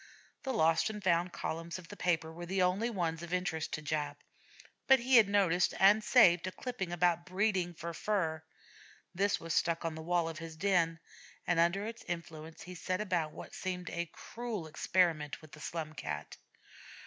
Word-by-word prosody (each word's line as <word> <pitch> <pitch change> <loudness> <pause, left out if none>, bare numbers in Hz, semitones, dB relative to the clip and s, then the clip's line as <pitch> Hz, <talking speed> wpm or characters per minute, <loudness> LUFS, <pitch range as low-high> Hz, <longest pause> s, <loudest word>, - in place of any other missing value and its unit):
The 265 - -2
'Lost 165 -4 +3
and 210 -2 -6
Found' 175 0 +2
columns 165 +1 -4
of 180 -3 -12
the 205 - -8
papers 165 -4 0
were 175 +1 -7
the 190 +1 +1
only 190 +6 +1
ones 170 -7 -2
of 170 0 -8
interest 170 -3 -2
to 155 - -3
Jap, 145 -1 -2 0.7
but 265 - +8
he 250 +1 +5
had 215 -4 +6
noticed 185 -3 +3
and 205 +3 +6
saved 180 -9 +5
a - - -3
clipping 230 -6 -5
about 175 -1 +2
'breeding 185 -2 0
for 170 +1 -5
fur.' 165 -5 -1 0.7
This 195 +2 +1
was 165 -1 -4
stuck 170 0 +1
on 165 - -1
the 160 - -7
wall 170 0 +1
of 165 0 -5
his 165 -1 -8
den, 170 -3 +2 0.5
and 175 -2 +2
under 170 +5 +2
its 230 +1 -7
influence 165 -2 -6
he 180 - -8
set 185 +1 -2
about 175 -7 0
what - - -10
seemed 180 -1 -4
a 170 0 -3
cruel 230 -7 -6
experiment 155 -1 +1
with 155 -2 -15
the 150 - -12
Slum 155 -2 -4
Cat. 75 - -5
175 Hz, 185 wpm, -33 LUFS, 165-195 Hz, 0.7 s, but